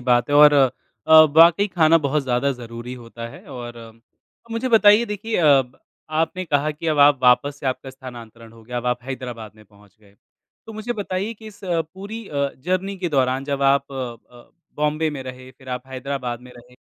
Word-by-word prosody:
बात 125 -1 +2
है, - - +1
और 150 0 +8 0.5
अ, 160 0 +9 0.2
वाक़ई 170 +5 +6
खाना 165 -2 +4
बहुत 150 0 -1
ज़्यादा 130 +1 0
ज़रूरी 120 -1 -9
होता 115 -1 -9
है - - -13
और 120 -3 -10 0.5
मुझे 230 +3 -2
बताइए 215 -1 +6
देखिए 210 +2 -4
अ, 170 - +2 0.2
ब 125 0 -21 0.3
आपने 160 +4 -1
कहा 150 -2 0
कि 155 +2 -7
अब 155 -2 0
आप 145 -1 +6
वापस 130 +3 +3
से - - -5
आपका 130 +1 -3
स्थानांतरण 120 -3 -12
हो 115 -1 -17
गया 125 +2 -7
अब 120 0 -3
आप 125 0 0
हैदराबाद 125 -5 -7
में 110 - -18
पहुँच 100 -1 -23
गए। 100 -2 -23 0.5
तो 225 - -9
मुझे 215 +3 -4
बताइए 205 -1 -3
कि 220 0 -14
इस 210 -2 -13
अ, 175 -3 0
पूरी 205 +3 -8
अ, 140 -1 -1
जर्नी 185 +6 -2
के 180 -1 -2
दौरान 135 -2 0
जब 140 -1 -3
आप 140 0 +2
अ, 120 -2 -9 0.3
बॉम्बे 150 +1 0
में 140 -3 -6
रहे 130 0 -10
फिर 130 +1 -17
आप 125 +1 -5
हैदराबाद 130 -2 -5
में 125 0 -14
रहे, 120 +1 -17
135 Hz, 200 wpm, -21 LUFS, 125-165 Hz, 0.5 s, अ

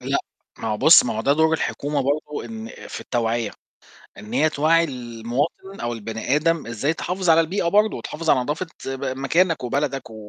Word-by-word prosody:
لأ - - 0 0.4
ما 115 - -3
هو 105 - 0
بُص، 155 +9 +8
ما 120 - -2
هو - - -1
ده 140 - +3
دور 160 +2 +3
الحكومة 145 -2 -2
برضه 145 +2 -2
إن 225 0 -7 0.2
في - - -6
التوعية، 115 -2 -1 0.7
إن 105 - -10
هي 155 - +3
توعّي 160 +3 +3
المواطن 125 - -4
أو 120 0 -2
البني 115 +4 -2
آدم، 165 +1 +1
إزاي 120 +7 -1
تحافظ 180 +1 -1
على 165 0 +7
البيئة 170 +2 0
برضه، 210 +4 +3
وتحافظ 160 +1 -3
على - - +4
نضافة 150 +8 -2 0.2
ب 135 +1 -4
مكانك، 165 +2 +1
وبلدك، 135 0 -2
و - - -10
145 Hz, 185 wpm, -22 LUFS, 120-165 Hz, 0.7 s, بُص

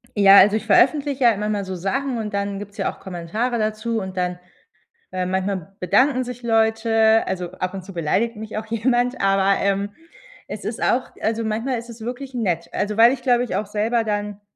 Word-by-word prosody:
Ja, 200 -1 +7
also, 205 +3 +5
ich 220 - -7
veröffentliche 275 +5 +3
ja 230 -4 +5
manchmal 210 -1 -1
so 190 -1 -5
Sachen 245 +8 -2
und 215 -2 -4
dann 200 0 -2
gibt's 205 0 -9
ja 195 - -1
auch - - -19
Kommentare 190 +7 -3
dazu 215 +1 -1
und 190 -1 -7
dann, 180 0 -1 0.7
äh, 185 0 -2
manchmal 190 0 -3
bedanken 255 +7 +2
sich 245 0 -8
Leute. 225 -1 +3
Also, 180 -2 -3
ab 185 +1 -4
und 190 - -6
zu 195 - -10
beleidigt 195 +8 0
mich 220 0 -7
auch 215 - -3
jemand, 240 +3 0
aber, 195 0 +3
ähm, 200 0 0 0.6
es - - -7
ist - - -4
auch - - +1
also, 225 +1 -1
manchmal 230 +4 -1
ist 235 +1 -9
es 235 0 -12
wirklich 250 +4 -6
nett. 180 -8 -2
Also, 205 +1 -2
weil 230 +3 +7
ich 260 - -5
glaube 245 -1 +2
ich 205 -6 -3
auch 210 - -2
selber 220 +3 0
dann 205 -1 -3
215 Hz, 200 wpm, -22 LUFS, 195-235 Hz, 0.7 s, Ja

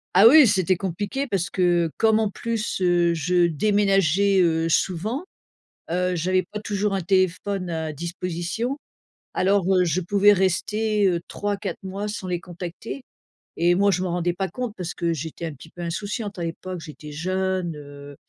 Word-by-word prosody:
Ah 195 +4 +9
oui, 295 +3 +9
c'était 190 -4 +2
compliqué 200 +9 -3
parce 195 -7 -1
que 175 -2 +2
comme 220 -1 +3
en 220 -2 +1
plus, 225 -1 -3
heu, 175 -1 +3
je 175 +2 +2
déménageais, 195 +1 +3
heu, 165 -1 +2
souvent, 195 - 0 0.7
heu, 180 +2 0
j'avais 185 +3 +1
pas 210 - -4
toujours 205 -1 -1
un 195 - 0
téléphone 185 +1 0
à 160 -2 -3
disposition, 175 - -3 0.6
alors, 195 0 +2
heu, 185 -1 +4
je 170 +1 0
pouvais 200 +3 +4
rester, 210 +3 +1
heu, 175 -2 +1
3-4 205 -3 -3
mois 195 +2 -4
sans 205 -2 -5
les 175 -1 -2
contacter 180 +8 -7 0.6
et 175 +1 +4
moi 200 +3 +3
je 185 -2 +1
m'en 180 - -2
rendais 175 0 0
pas 190 +1 -3
compte 250 -4 -4
parce 180 -1 -4
que 170 -1 -1
j'étais 160 +2 -5
un 160 - -6
petit 145 +3 -14
peu 175 - -10
insouciante 200 +4 -4
à 175 - -3
l'époque. 175 +2 -5
J'étais 150 -1 -10
jeune, 185 +1 -1
heu 145 -1 -11
185 Hz, 170 wpm, -24 LUFS, 170-205 Hz, 0.7 s, Ah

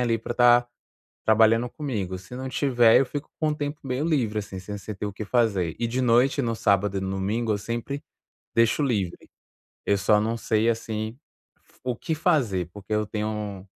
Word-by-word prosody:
ali 115 -2 +1
pra 115 - -4
estar 120 0 +5 0.6
trabalhando 110 +2 +4
comigo, 110 -11 -4
se 95 +6 -12
não 130 +1 -4
tiver, 120 -4 +4
eu 135 - +1
fico 145 +3 -5
com 155 - +2
o 150 - +1
tempo 145 0 -4
meio 130 +2 -2
livre, 125 -10 +1
assim, 100 -2 -5
sem 105 +3 -6
se 105 +2 -7
ter 100 - -4
o 100 - -4
que 105 +2 -6
fazer. 100 -8 +1
E 120 - 0
de 125 +3 -1
noite, 125 +3 +3
no 115 -1 0
sábado 100 -2 +2
e - - 0
no 95 0 -3
domingo, 105 +4 -1
eu 105 - -1
sempre 120 +6 -4 0.5
deixo 115 +5 +3
livre. 100 -10 -2 0.6
Eu 100 - +3
só 105 +2 +3
não 110 +2 -1
sei, 110 -1 +1
assim, 110 0 -4 0.4
f - - -28
o 125 -1 -1
que 160 - -2
fazer, 130 - +1
porque 105 +2 -9
eu 105 0 0
tenho 105 -2 -4
115 Hz, 200 wpm, -25 LUFS, 105-125 Hz, 0.6 s, estar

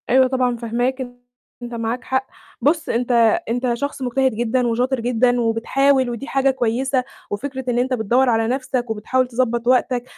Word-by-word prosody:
أيوه، 260 +1 +5
طبعًا، 255 -2 0
فاهماك 245 +3 -1 0.6
أنت 240 0 -7
معاك 230 +1 -3
حق، 260 0 -1 0.3
بُص 310 +3 +1
أنت 245 +2 0 0.4
أنت 245 +1 0
شخص 285 +3 -4
مجتهد 260 -1 +1
جدًا 240 +2 0
وشاطر 250 +3 0
جدًا 245 +1 +2
وبتحاول 260 +4 +2
ودي 240 +4 -5
حاجة 270 -1 +2
كويسة، 255 +1 0 0.3
وفكرة 265 +5 -4
إن 240 0 +1
أنت 255 +1 0
بتدوّر 245 +3 +2
على 225 -1 +2
نَفْسك 255 -1 -2
وبتحاول 250 +4 0
تضبّط 240 -1 -1
وقتك، 250 -1 +2
250 Hz, 160 wpm, -20 LUFS, 235-260 Hz, 0.6 s, أيوه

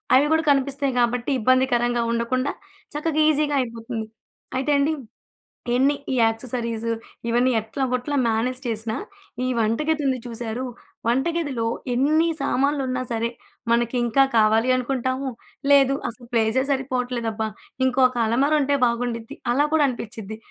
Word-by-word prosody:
అవి 275 - +5
కూడా 320 0 +2
కనిపిస్తాయి 275 -1 0
గాబట్టి, 240 +3 +1
ఇబ్బందికరంగా 240 -1 +2
ఉండకుండా 255 +4 0 0.4
చక్కగా 310 0 0
ఈసీగా 295 -1 +1
అయిపోతుంది. 230 -1 -5 0.5
అయితే 270 +3 0
అండి, 295 +3 +2 0.8
ఎన్ని 275 +3 +3 0.2
ఈ - - +1
యాక్సెసరీస్, 230 0 -2 0.4
ఇవన్నీ 245 +2 +3
ఎట్లాగోట్లా 255 +4 -2
మ్యానేజ్ 240 +3 0
చేసినా, 220 0 -2 0.5
ఈ - - 0
వంట 220 +1 +1
గదుంది 280 -5 +1
చూసారూ! 230 +1 -4 0.4
వంట 260 +6 +2
గదిలో 265 -8 -2 0.3
ఎన్ని 310 +6 +3
సామాన్లున్నా 270 -2 0
సరే, 230 0 0 0.4
మనకింకా 240 +2 +3
కావాలి 220 +3 +4
అనుకుంటాము. 260 +1 -1 0.4
లేదు, 275 -1 +6
అసలు 240 0 -12
ప్లేసే 225 +3 +2
సరిపోవట్లేదబ్బా! 250 -4 -1 0.4
ఇంకొక 255 -1 +3
అలమారా 275 +7 +3
ఉంటే 280 +1 +2
బాగుండుద్ది, 235 +2 -2 0.2
అని 285 +4 +3
కూడా 305 -2 +5
అనిపిచ్చిద్ది. 220 -3 -7
255 Hz, 120 wpm, -23 LUFS, 230-275 Hz, 0.8 s, లేదు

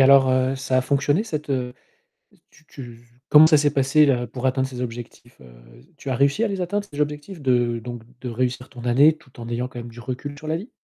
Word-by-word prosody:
alors, 135 -1 +6 0.2
ça 130 -1 0
a - - +3
fonctionné 145 +6 +1
cette, 150 -8 -5
heu, 125 -2 -2 0.8
tu 160 - -23
tu 120 -6 -11 0.3
comment 150 +1 +8
ça 160 - +6
s'est 145 -1 +2
passé 140 +2 +4
là 125 -3 +1
pour 125 +2 -4
atteindre 130 0 0
ces 125 -2 -7
objectifs? 120 0 -8
Heu, 60 -2 -15 0.4
tu - - -9
as - - 0
réussi 140 - +2
à - - 0
les 195 -2 -3
atteindre, 205 +3 -2
ces 145 0 -6
objectifs 150 +4 -3
de 120 -3 +1
donc 120 0 -7 0.2
de 125 - -5
réussir 125 +1 -2
ton 120 -2 -11
année 140 +6 +5
tout 130 -5 -18
en 115 - -7
ayant 120 +1 -2
quand 125 -2 -8
même 120 - -8
du 115 0 -13
recul 130 +4 -6
sur 155 - -10
la 155 +1 0
vie? 200 +9 -9
130 Hz, 235 wpm, -23 LUFS, 120-150 Hz, 0.8 s, comment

